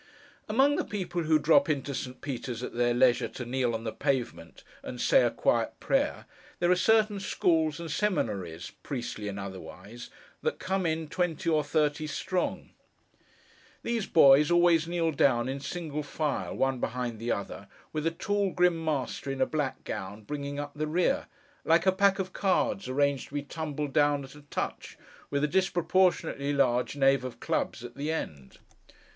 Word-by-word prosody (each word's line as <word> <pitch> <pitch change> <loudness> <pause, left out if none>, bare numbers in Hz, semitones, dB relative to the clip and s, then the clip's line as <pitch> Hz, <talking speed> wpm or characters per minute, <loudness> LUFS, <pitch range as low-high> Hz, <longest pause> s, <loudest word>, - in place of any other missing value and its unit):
Among 270 +6 +3
the - - 0
people 180 -4 -3
who 155 0 +4
drop 155 +2 +4
into 140 -1 -1
St. 125 -1 -6
Peter's 125 -3 -5
at - - -5
their 120 0 +2
leisure, 120 0 +3
to 125 - -7
kneel 120 -1 0
on 115 - -5
the 110 - -3
pavement, 130 0 -3 0.2
and - - -7
say - - +5
a - - +3
quiet - - 0
prayer, - - 0 0.3
there 175 0 +2
are - - +6
certain 215 +1 +3
schools 160 -5 +1
and 165 -2 -5
seminaries, 100 - -2
priestly 120 -5 -5
and 100 -1 -4
otherwise, 100 +3 -9 0.3
that - - -1
come 190 -1 -1
in, 160 0 -1
twenty 175 +1 -1
or 155 -1 +3
thirty 150 +1 0
strong. 180 +4 -2 1.1
These 235 -3 -1
boys 145 -2 +6
always 175 -2 +4
kneel 170 -1 0
down 130 -4 +2
in 135 +1 -3
single 150 +1 -4
file, 150 0 -3
one 135 -1 0
behind 120 -2 -3
the 115 +1 -2
other, 100 0 -4 0.3
with 155 +1 -1
a - - +4
tall 200 +4 -1
grim 180 -2 +2
master 140 -3 -2
in 135 0 -3
a 130 - +4
black 150 -4 -3
gown, 105 +1 -6
bringing 140 +4 -5
up 145 0 -4
the 155 +1 -3
rear: 180 - +1 0.4
like 165 +2 +3
a 190 - +6
pack 195 +1 +3
of 190 -1 -4
cards 195 -3 0
arranged 140 +1 +1
to 145 - -11
be 145 - -1
tumbled 150 -2 -4
down 145 -1 +3
at 135 - -11
a 150 - -13
touch, - - -4 0.3
with 140 0 -1
a - - +3
disproportionately 175 -4 +1
large 125 -2 +1
Knave 135 -1 +3
of 130 -2 -7
clubs 120 - -2
at 120 0 -8
the 145 +3 -2
end. 70 - -5
145 Hz, 175 wpm, -29 LUFS, 130-170 Hz, 1.1 s, are